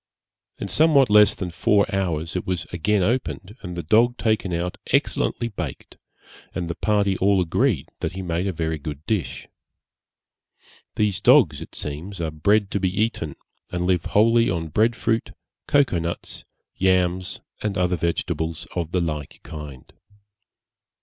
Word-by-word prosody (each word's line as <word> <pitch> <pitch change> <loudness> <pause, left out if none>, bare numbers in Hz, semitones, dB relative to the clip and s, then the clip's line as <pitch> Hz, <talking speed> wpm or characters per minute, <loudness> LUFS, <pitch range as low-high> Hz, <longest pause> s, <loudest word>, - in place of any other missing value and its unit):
In - - -4
somewhat 145 -7 +4
less 105 0 +6
than 90 -2 -4
four 100 +4 +3
hours, 85 -4 -1
it 90 - -3
was 90 -3 -1
again 95 +3 +1
opened, 105 -3 -2
and 90 -2 -7
the 85 - -3
dog 115 +9 +3
taken 110 -6 0
out 85 +1 -3
excellently 120 - +1
baked, 90 - -7 0.6
and 90 -2 -2
the 85 - -2
party 100 +1 +1
all 100 0 +3
agreed 90 - +1
that - - -3
he 95 0 -5
made 85 +2 -1
a - - 0
very 80 -2 -2
good 75 0 -7
dish. 105 -6 -2 1.5
These 105 -3 0
dogs - - +5
it - - -10
seems 85 +7 -5
are 80 -2 -2
bred 100 +7 +2
to 100 - 0
be 95 -1 +1
eaten, 105 -9 -1 0.4
and 90 0 -2
live 90 -2 +1
wholly 115 +2 +4
on 85 -3 -2
bread 110 +9 +2
fruit, 115 +2 -1 0.3
cocoa 140 -11 +3
nuts, 85 +1 -5 0.3
yams, 95 -1 +1 0.2
and 105 -2 -2
other 90 0 +2
vegetables 80 -1 -2
of 85 -2 -3
the 90 - +2
like 75 -4 -4
kind. 75 -5 -9
90 Hz, 155 wpm, -23 LUFS, 85-105 Hz, 1.5 s, less